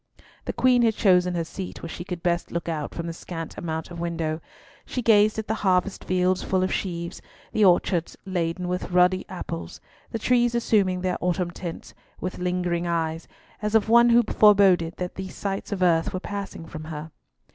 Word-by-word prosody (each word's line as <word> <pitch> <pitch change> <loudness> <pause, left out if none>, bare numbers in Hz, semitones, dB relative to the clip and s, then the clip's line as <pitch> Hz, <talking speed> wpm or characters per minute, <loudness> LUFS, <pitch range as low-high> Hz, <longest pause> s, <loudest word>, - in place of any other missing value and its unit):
The - - -3
Queen 250 -1 +4
had 225 -2 +3
chosen 180 -4 +3
her 170 - 0
seat 185 +3 -7
where - - -4
she 175 - -6
could 175 -2 -6
best 175 -1 0
look 170 0 -3
out 155 -3 -3
from 170 - -4
the 165 - -4
scant 165 -1 -7
amount 160 0 -4
of 170 - -7
window. 165 -2 -2 0.4
She 250 - -4
gazed 215 -1 +5
at 220 - -3
the 220 - 0
harvest 190 0 +1
fields 185 0 +1
full 185 -1 0
of 185 - 0
sheaves, 170 -2 -4 0.3
the 215 - +2
orchards 175 -2 +2
laden 180 -1 -2
with 180 0 -3
ruddy 180 +1 +3
apples, 85 - -6 0.3
the - - -3
trees 240 +1 +2
assuming 195 -6 +2
their 180 -1 -1
autumn 180 0 0
tints, 170 -1 -7 0.3
with 185 - -4
lingering 180 -1 -1
eyes, 165 -1 -2 0.3
as 210 +1 -1
of 220 -1 +3
one 235 +1 +7
who 235 0 +6
foreboded 195 -6 +4
that 180 -1 -4
these 190 -1 -7
sights 195 0 -4
of 190 -2 -1
earth 165 +1 +3
were - - -1
passing 200 -4 -6
from 155 -1 -8
her. 155 0 -7
180 Hz, 190 wpm, -25 LUFS, 170-200 Hz, 0.4 s, one